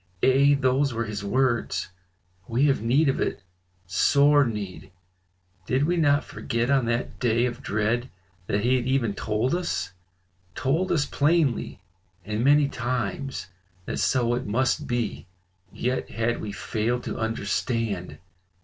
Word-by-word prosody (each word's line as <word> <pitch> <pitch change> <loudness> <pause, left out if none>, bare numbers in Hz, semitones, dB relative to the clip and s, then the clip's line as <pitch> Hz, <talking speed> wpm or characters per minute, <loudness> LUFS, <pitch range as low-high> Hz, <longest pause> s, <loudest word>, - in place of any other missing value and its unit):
Ay! 140 +2 +5
those 130 -1 +2
were 115 +1 -1
his 105 -1 -5
words. 120 +3 0 0.6
We 120 +5 +2
have 140 -6 +2
need 130 +7 +3
of 135 - +1
it, 80 - -2 0.4
sore 140 +11 +4
need; 105 -6 -5 0.8
did 130 +2 +1
we 175 +4 +1
not 145 -4 +3
forget 115 +1 -2
on 135 -3 +3
that 120 +1 -2
day 120 0 +2
of 120 +1 -4
dread 115 +3 -1 0.4
that 100 - 0
he 125 +3 +3
had 125 0 -2
even 130 -6 +1
told 110 +5 -1
us, 175 - -2 0.6
told 160 +8 0
us 150 -3 +2
plainly, 145 - +1 0.4
and 105 +3 -2
many 145 +1 +5
times, 125 -2 -3 0.4
that - - -3
so 120 -2 +2
it 125 -1 -2
must 130 +7 0
be? 120 -7 -2 0.4
yet 125 +1 -2
had 115 +1 -1
we 105 - -4
failed 115 +4 -2
to - - -5
understand. 110 - -2
125 Hz, 140 wpm, -25 LUFS, 110-135 Hz, 0.8 s, Ay